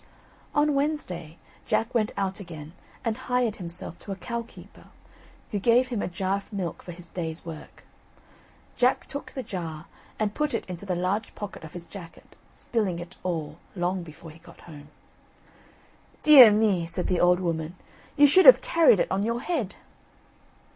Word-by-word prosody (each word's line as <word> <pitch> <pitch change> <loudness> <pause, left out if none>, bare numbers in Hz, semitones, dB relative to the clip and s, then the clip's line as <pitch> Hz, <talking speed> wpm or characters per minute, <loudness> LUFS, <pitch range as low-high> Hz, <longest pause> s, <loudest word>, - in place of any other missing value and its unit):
On 295 0 +3
Wednesday, 185 - -2 0.3
Jack 225 +3 0
went 220 -3 +1
out 195 0 -1
again 160 -5 -9 0.3
and 225 -1 0
hired 250 -3 -1
himself 170 -2 -7
to 200 - -9
a - - -2
cow 235 +5 -4
keeper, 230 - -15 0.7
who 205 - -1
gave 240 +4 +3
him 235 -5 -2
a - - -2
jar 190 +2 -1
of 200 - -11
milk 185 -6 -4
for 175 - -9
his 175 0 -10
day's 165 -1 -5
work. 160 -2 -10 0.9
Jack 250 +1 +2
took 285 - -7
the 260 - -4
jar 165 -7 -6 0.3
and 210 -1 -1
put 300 +2 0
it - - -3
into 185 +2 -8
the 180 - 0
large 190 +5 -2
pocket 205 -5 -7
of 160 - -10
his 175 -1 -7
jacket, 170 -1 -12 0.2
spilling 210 -7 -1
it 175 +2 -9
all, 160 -3 -4 0.2
long 180 +1 -1
before 160 0 -11
he 160 - -16
got - - -16
home. 150 -3 -12 1.4
"Dear 275 -7 +10
me!" 205 -5 +2
said 175 +2 -3
the 180 - 0
old 180 0 +4
woman; 165 -1 -3 0.4
"you 290 - +8
should 360 +7 +6
have - - +11
carried 325 - +4
it - - 0
on 190 +1 +1
your 230 +3 -1
head." 265 - -2
190 Hz, 175 wpm, -26 LUFS, 170-235 Hz, 1.4 s, have